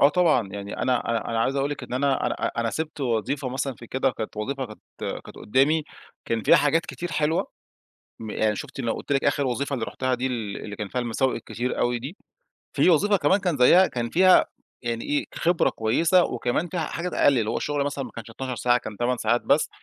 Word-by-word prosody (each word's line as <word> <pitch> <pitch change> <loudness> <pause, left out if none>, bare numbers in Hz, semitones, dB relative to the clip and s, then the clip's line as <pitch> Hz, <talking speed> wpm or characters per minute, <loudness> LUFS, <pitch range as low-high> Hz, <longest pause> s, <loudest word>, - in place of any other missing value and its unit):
آه، 140 - +8
طبعًا. 150 - +2
يعني 100 0 -6
أنا 125 -2 0
أنا 115 - -1
أنا 115 0 0
عايز 135 +4 +1
أقول 140 +1 0
لِك 145 - -5
إن 125 - -9
أنا 135 +1 +1
أنا - - 0
أنا 115 -1 -2
سِبت 155 -1 -4
وظيفة 130 +2 -1
مثلًا 130 +1 -2
في 115 - -12
كده، 130 +2 0
كانت 110 -2 -6
وظيفة 130 +5 -3
كانت 110 - -13 0.4
كانت - - -12
قدامي، 145 +7 +2 0.4
كان 115 -2 -1
فيها - - +6
حاجات 160 +4 +2
كتير 175 -1 -6
حلوة 160 +5 +1 0.7
م 110 -1 -6
يعني 105 -1 0
شُفتِ 135 - -6
أنا 115 -2 0
قُلت 145 - -4
لِك 135 - +1
آخر 140 -2 +2
وظيفة 140 +3 -1
أنا 110 - -2
رُحتها 130 -1 -1
دي 125 +2 -2
ال 110 -6 -3
اللي 105 -1 -7
كان 105 -3 -4
فيها 125 - -2
المساوئ 120 +2 0
الكتير 120 +2 -4
أوي 120 0 +1
دي، 140 - -7 0.6
فيه - - +4
وظيفة 200 +5 +4
كمان 185 +6 +3
كان 175 -7 -1
زيها، 175 +9 +6
كان 120 -1 -3
فيها 185 +4 +6 0.4
يعني 115 -1 -3
إيه 145 - 0
خبرة 175 0 +2
كويسة، 165 +11 +3
وكمان 120 +8 -1
فيها 175 0 -3
حاجات 170 +3 -3
أقل، 140 -3 +4
اللي 110 0 -1
هو - - -1
الشغل 145 -1 -1
مثلًا 140 -1 -3
ما 115 - -10
كانش 115 0 -9
12 130 +2 -5
ساعة، 120 0 +3
كان 105 -4 -8
8 125 +1 0
ساعات 115 +2 +1
بس. - - +2
130 Hz, 225 wpm, -25 LUFS, 115-145 Hz, 0.7 s, آه